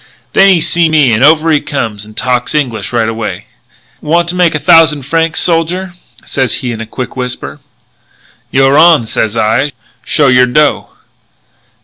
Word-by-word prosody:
"Then 195 0 +4
he 185 -3 +3
seen 170 0 +1
me 140 -7 +3
and 110 - +1
over 160 +2 +3
he 150 - +2
comes 110 -7 -5
and 110 0 -17
talks 125 +2 -2
English 115 -9 -2
right 115 -2 0
away: 110 -5 -5 0.6
'Want 170 +2 0
to 180 - -4
make 175 -3 +1
a - - -1
thousand 165 -4 +3
francs, 165 +3 -1
soldier?' 175 +2 +1 0.3
sez 130 -2 -1
he 125 - -2
in 115 -1 -6
a 115 - -8
quick 125 +3 -7
whisper. 125 -1 -5 0.9
'You're 135 +2 +2
on,' 160 -7 +4
sez 110 0 -3
I; 115 +6 0 0.3
'show 145 -3 +1
your 125 -1 +4
dough.' 145 +3 0
140 Hz, 165 wpm, -11 LUFS, 120-165 Hz, 0.9 s, Then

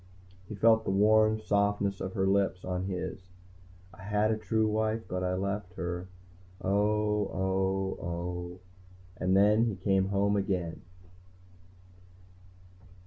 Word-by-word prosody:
He 105 - -5
felt 110 +2 +4
the - - -3
warm 110 +2 +4
softness 100 -2 0
of 95 - -4
her 95 -3 0
lips 95 -2 +1
on 90 0 -2
his. 95 -1 -4 0.7
I - - -14
had 105 +2 +1
a - - +2
true 110 0 0
wife 110 +1 0
but 90 0 -3
I 90 0 0
left 100 -1 -3
her... 90 +1 -4 0.5
oh, 105 +1 +1
oh, 95 0 -1
oh. 90 +1 -5 0.6
And 95 +1 +2
then 105 +3 +5
he 110 -4 -1
came 95 +1 +1
home 100 +1 +1
again. 95 -4 -2
100 Hz, 130 wpm, -29 LUFS, 95-105 Hz, 0.7 s, then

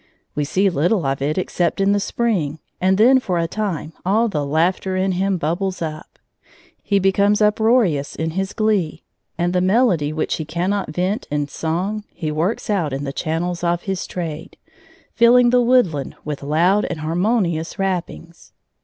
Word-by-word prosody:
We 150 0 -1
see 190 +7 +1
little 175 +1 +1
of 135 0 -1
it 150 +4 -1
except 175 -1 -1
in 195 0 +3
the 205 - +2
spring, 195 -9 -1 0.2
and 190 +1 +3
then 255 +5 +6
for 185 -8 -2
a 165 0 0
time 175 -5 -3
all 215 +6 +2
the 150 -9 -2
laughter 170 +6 0
in 190 +1 +1
him 190 +1 0
bubbles 180 +4 -2
up; 155 -2 -6 0.6
he 200 - +1
becomes 200 +2 +3
uproarious 210 - +2
in 160 0 -2
his 190 +3 -2
glee, 210 -7 0 0.3
and 175 +1 0
the 180 - +2
melody 185 - +2
which 155 0 -2
he 160 - -3
cannot 180 +5 -2
vent 185 +6 -2
in 145 -1 -1
song 180 +8 -3
he 155 -2 -4
works 165 +8 -1
out 175 -9 0
in 135 +1 -3
the 135 -1 -4
channels 170 +3 -2
of 170 0 0
his 190 -2 -3
trade, 165 -2 -6 0.6
filling 240 +1 +5
the 250 0 +4
woodland 235 - +2
with 150 -2 -4
loud 170 +8 +2
and 155 - -5
harmonious 170 0 0
rappings. 175 -3 -4
180 Hz, 170 wpm, -20 LUFS, 160-200 Hz, 0.6 s, then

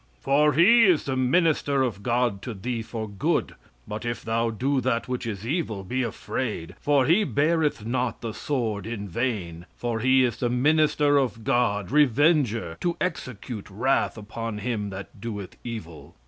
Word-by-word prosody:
"For 150 +2 +3
he 225 - +6
is 180 -6 +4
the 135 - -2
minister 140 0 +2
of 110 -6 -2
God 120 -3 0
to 120 -1 -6
thee 115 +4 -3
for 110 0 -5
good. 100 -2 -1 0.3
But 105 +2 -5
if 120 0 -3
thou 115 +1 +1
do 130 +5 0
that 115 -1 0
which 125 -1 -3
is 105 -1 -5
evil, 120 - -2
be 125 +7 -2
afraid; 110 -5 -3
for 145 -3 +3
he 175 +9 +4
beareth 150 - +1
not 125 +1 -1
the 115 -2 -4
sword 110 -8 -2
in 105 -3 -5
vain; 90 -5 -3
for 120 -2 -2
he 130 +2 +4
is 120 -3 0
the 120 - 0
minister 145 +2 +3
of 120 -4 -2
God, 105 -5 +1
revenger 140 - +3
to 175 -1 -1
execute 125 - -4
wrath 115 +5 0
upon 115 +1 -5
him 105 -1 -2
that 100 +1 -9
doeth 100 -4 -6
evil. 85 - -8
120 Hz, 165 wpm, -25 LUFS, 105-140 Hz, 0.3 s, he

